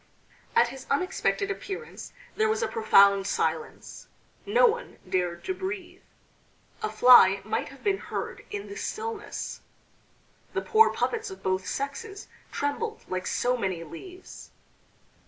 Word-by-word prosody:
At 240 - +5
his 265 +1 -10
unexpected 365 +5 0
appearance 400 +3 -7 0.2
there 435 0 +2
was 440 +1 0
a - - +1
profound 200 -3 +5
silence: 160 -1 -3 0.4
no 480 +5 +5
one 475 +1 0
dared 175 -2 -1
to 375 - -2
breathe. 375 -1 -6 0.8
A 430 - -1
fly 240 -6 +7
might 215 - -2
have 275 0 -15
been 395 -1 +1
heard - - -5
in 410 -1 -5
the 400 - -8
stillness. 440 -1 -5 0.9
The - - 0
poor 450 0 +5
puppets 445 -1 -2
of 385 - -11
both 185 0 -1
sexes 390 +10 -5 0.2
trembled 435 +11 -3
like 185 0 -3
so 250 +1 +1
many 190 -7 -2
leaves. 360 - -11
365 Hz, 135 wpm, -27 LUFS, -, 0.9 s, fly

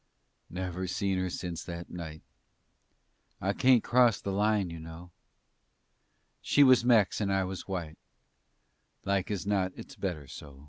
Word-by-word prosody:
Never 90 +1 -4
seen 95 +1 -1
her 95 0 -1
since 85 -1 -5
that 85 0 -7
night. 80 -3 -7 1.2
I 100 +2 0
kaint 125 +1 +4
cross 120 -4 +4
the 100 - -4
Line, 105 -2 +1
you 85 - -7
know. 80 +2 -10 1.3
She 145 - +4
was 130 -3 +6
Mex 110 -5 +3
and 100 -1 0
I 95 0 +2
was 95 0 -6
white; 85 -5 -5 1.1
Like 100 -1 0
as 100 -3 -3
not 95 -2 0
it's - - -10
better 80 -7 -4
so. 70 -1 -11
95 Hz, 145 wpm, -30 LUFS, 85-100 Hz, 1.3 s, was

